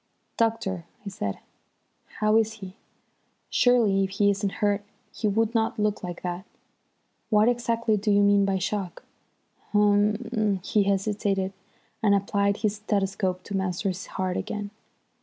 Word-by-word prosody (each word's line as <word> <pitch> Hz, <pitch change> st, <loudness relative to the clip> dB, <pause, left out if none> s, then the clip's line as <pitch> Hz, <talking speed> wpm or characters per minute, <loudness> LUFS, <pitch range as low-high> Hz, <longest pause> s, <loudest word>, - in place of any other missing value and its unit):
"Doctor," 195 Hz, -6 st, 0 dB, 0.2 s
I -, -, -3 dB
said, 100 Hz, -, -4 dB, 0.8 s
"how 215 Hz, 0 st, +3 dB
is 220 Hz, -1 st, +3 dB
he? 190 Hz, -3 st, -10 dB, 0.8 s
Surely, 225 Hz, -6 st, +4 dB
if 190 Hz, -, -1 dB
he 200 Hz, +1 st, +3 dB
isn't 200 Hz, 0 st, -2 dB
hurt 205 Hz, -1 st, 0 dB, 0.3 s
he 215 Hz, -, -1 dB
would 220 Hz, +2 st, +1 dB
not 225 Hz, -1 st, +1 dB
look 210 Hz, -1 st, 0 dB
like 175 Hz, -1 st, -6 dB
that. 180 Hz, +1 st, -3 dB, 0.9 s
What 215 Hz, 0 st, +4 dB
exactly 235 Hz, -2 st, +1 dB
do 210 Hz, +2 st, -2 dB
you 205 Hz, 0 st, +5 dB
mean 200 Hz, 0 st, +5 dB
by 195 Hz, -1 st, +1 dB
shock?" 190 Hz, 0 st, -3 dB, 0.7 s
"Hum 205 Hz, 0 st, +4 dB, 0.2 s
er," 210 Hz, -3 st, +1 dB
he 205 Hz, 0 st, +2 dB
hesitated, 195 Hz, -1 st, 0 dB, 0.5 s
and 200 Hz, -2 st, +4 dB
applied 200 Hz, +1 st, +1 dB
his 215 Hz, -1 st, -1 dB
stethoscope 195 Hz, -3 st, -1 dB
to 200 Hz, -, -5 dB
Masters' 190 Hz, 0 st, -2 dB
heart 185 Hz, -1 st, -2 dB
again. 205 Hz, -1 st, -4 dB
200 Hz, 140 wpm, -26 LUFS, 195-215 Hz, 0.9 s, you